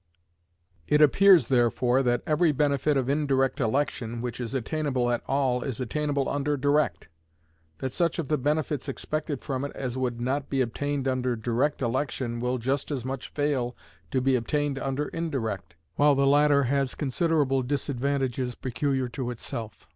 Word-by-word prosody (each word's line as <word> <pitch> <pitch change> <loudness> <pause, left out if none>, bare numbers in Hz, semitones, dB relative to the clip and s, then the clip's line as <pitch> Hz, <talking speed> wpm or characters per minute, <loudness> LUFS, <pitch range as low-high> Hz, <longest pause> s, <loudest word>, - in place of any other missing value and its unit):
It 150 - +3
appears, 180 +4 +6
therefore, 125 0 +2
that 120 -2 +1
every 155 +1 +3
benefit 145 0 +1
of 130 -2 0
indirect 140 -1 +1
election 120 -2 -1
which 125 +1 -4
is 120 +2 -4
attainable 130 -2 0
at 120 - 0
all 130 -2 +1
is 130 -4 -4
attainable 140 +2 -1
under 145 +1 0
direct; 145 +2 +1 0.7
that 130 -1 -4
such 170 -1 0
of 165 -5 -2
the 150 0 +1
benefits 150 0 -1
expected 150 0 -3
from 135 -2 -3
it 140 - -3
as 130 -2 -4
would 120 -2 -1
not 135 +3 -2
be 135 - 0
obtained 135 +3 -1
under 130 -1 0
direct 120 +6 0
election 120 -1 -2
will 125 +1 0
just 130 +4 -1
as 135 -5 -3
much 130 0 -4
fail 135 -5 -1 0.3
to 130 - 0
be 135 0 +3
obtained 140 +3 -1
under 135 +2 -2
indirect; 110 - -3 0.2
while 145 0 +5
the 140 0 +3
latter 145 0 +4
has 135 0 0
considerable 145 -1 +1
disadvantages 130 -2 -1
peculiar 130 +1 -1
to 125 0 -4
itself. 115 -2 -6
135 Hz, 160 wpm, -27 LUFS, 125-145 Hz, 0.7 s, appears